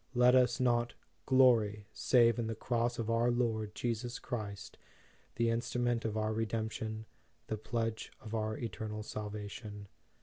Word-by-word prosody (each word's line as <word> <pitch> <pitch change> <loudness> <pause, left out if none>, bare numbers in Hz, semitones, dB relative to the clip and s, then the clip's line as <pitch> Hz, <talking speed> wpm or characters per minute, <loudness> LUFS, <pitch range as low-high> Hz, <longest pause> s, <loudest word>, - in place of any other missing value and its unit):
Let 125 +1 +6
us 125 -2 +4
not 120 -1 +2 0.3
"glory, 115 -6 +4
save 120 -2 +4
in 115 - -1
the 115 - -2
Cross 120 +1 0
of 115 0 -1
our 115 +1 +3
Lord 110 -3 0
Jesus 120 +1 -2
Christ," 100 -6 -6 0.6
the 115 0 +2
instrument 120 0 0
of 110 -1 -1
our 110 0 0
Redemp 110 0 -1
tion, 110 0 -4 0.4
the 110 - -3
pledge 115 0 -2
of 110 - -9
our 110 -1 -1
eternal 110 -2 -4
salvation. 105 -1 -6
115 Hz, 145 wpm, -33 LUFS, 110-120 Hz, 0.6 s, Let